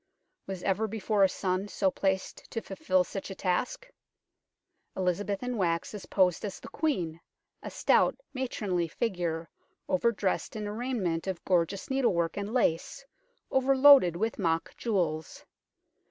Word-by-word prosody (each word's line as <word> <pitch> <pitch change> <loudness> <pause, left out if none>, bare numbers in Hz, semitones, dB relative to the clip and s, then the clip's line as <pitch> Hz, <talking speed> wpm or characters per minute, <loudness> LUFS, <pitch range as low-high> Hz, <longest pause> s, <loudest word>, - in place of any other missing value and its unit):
Was 190 -2 -5
ever 200 +3 +1
before 215 -1 -1
a 190 - +5
son 185 +1 -1
so 195 -2 +1
placed 190 0 -2
to 225 - -3
fulfil 185 -3 0
such 195 +2 -6
a 190 - -6
task? 190 - -1 1.1
Elizabeth 190 +3 -1
in 250 -1 -2
wax 170 -2 0
is 195 -4 -8
posed 180 -3 +2
as 200 -3 -5
the - - -10
Queen, 175 - -1 0.4
a - - -6
stout, - - +3 0.2
matronly 205 -10 -1
figure, 170 -4 -2 0.4
over 210 +6 +2
dressed 200 0 -2
in 215 -1 -4
a 205 - -4
raiment 210 -9 -2
of 185 -3 -4
gorgeous 185 +5 0
needlework 180 -11 +1
and 205 +1 -4
lace, 250 +4 0 0.5
over 265 +1 +3
loaded 265 - +8
with 220 +6 -2
mock 165 -3 0
jewels. 170 -9 -2
195 Hz, 145 wpm, -29 LUFS, 175-225 Hz, 1.1 s, loaded